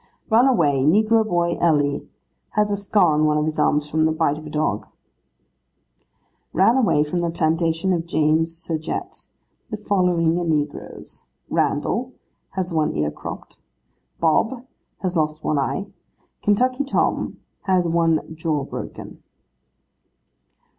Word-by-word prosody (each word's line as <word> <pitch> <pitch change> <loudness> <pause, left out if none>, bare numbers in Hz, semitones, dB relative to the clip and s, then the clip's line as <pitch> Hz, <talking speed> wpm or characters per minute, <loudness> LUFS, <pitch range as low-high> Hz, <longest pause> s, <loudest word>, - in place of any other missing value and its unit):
'Ran 235 +4 +6
away, 145 - +3
negro 215 +8 +4
boy 175 -4 0
Ellie. 145 -4 +1 0.5
Has 210 0 +3
a - - +2
scar 195 -4 +2
on 155 +1 +2
one 150 0 +2
of 150 - +1
his 155 0 -2
arms 150 0 +2
from 155 +1 +1
the - - +1
bite 155 -2 0
of 155 - -10
a - - -7
dog.' 150 -9 -1 1.7
'Ran 195 +8 +4
away, 215 - +3
from 150 +4 -2
the 170 -1 0
plantation 165 +2 +1
of 170 -1 -2
James 160 +1 +2
Surgette, 165 -1 -5 0.4
the 215 - -4
following 180 -5 +1 0.2
negroes: 150 - -3 0.2
Randal, - - 0 0.4
has 185 -2 -2
one 155 -2 +1
ear 75 0 0
cropped; - - -9 0.6
Bob, 225 +10 +1 0.4
has 185 -1 -2
lost 155 -1 -1
one 150 - +1
eye; 165 +8 -1 0.6
Kentucky 255 +6 +2
Tom, 280 - 0 0.3
has 185 -3 +2
one 165 -1 +2
jaw 155 -2 -1
broken. - - -8
165 Hz, 135 wpm, -22 LUFS, 155-190 Hz, 1.7 s, Ran